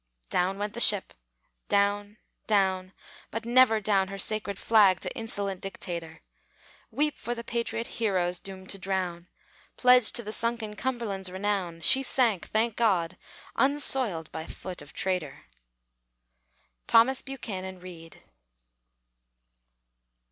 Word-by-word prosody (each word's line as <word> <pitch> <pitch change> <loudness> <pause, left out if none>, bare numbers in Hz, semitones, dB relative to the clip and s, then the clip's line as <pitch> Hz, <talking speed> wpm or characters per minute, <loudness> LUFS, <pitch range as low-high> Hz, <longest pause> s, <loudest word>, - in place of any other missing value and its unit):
Down 185 +2 0
went 205 +1 -4
the 235 - -6
ship! 205 -4 +4 0.6
Down, 205 +1 +1 0.3
down; 190 -3 +1 0.4
but 225 +1 -5
never 240 -2 +5
down 195 -2 +1
Her 195 +1 -7
sacred 205 -1 -1
flag 200 -5 +4
to - - -4
insolent 200 -4 -4
dictator. 170 -4 -5 0.7
Weep 300 +1 -1
for 240 +3 -4
the 235 - -7
patriot 235 0 -3
heroes, 185 -7 -1
doomed 190 -1 -7
to 195 - -4
drown; 185 -2 -3 0.5
Pledge 250 -2 +6
to 235 - 0
the 215 0 -6
sunken 230 -2 -2
Cumberland's 210 -7 -3
renown. 190 -3 -2
She 265 +11 +6
sank, 240 -8 +1
thank 220 +1 0
God! 185 -7 +1 0.4
unsoiled 265 - +3
by 160 0 -7
foot 185 -4 -8
of 145 - -12
traitor! 170 -7 -3 1.4
THOMAS 245 +3 +4
BUCHANAN 190 -9 -7
READ. 170 -2 -12
200 Hz, 120 wpm, -27 LUFS, 185-230 Hz, 1.4 s, Pledge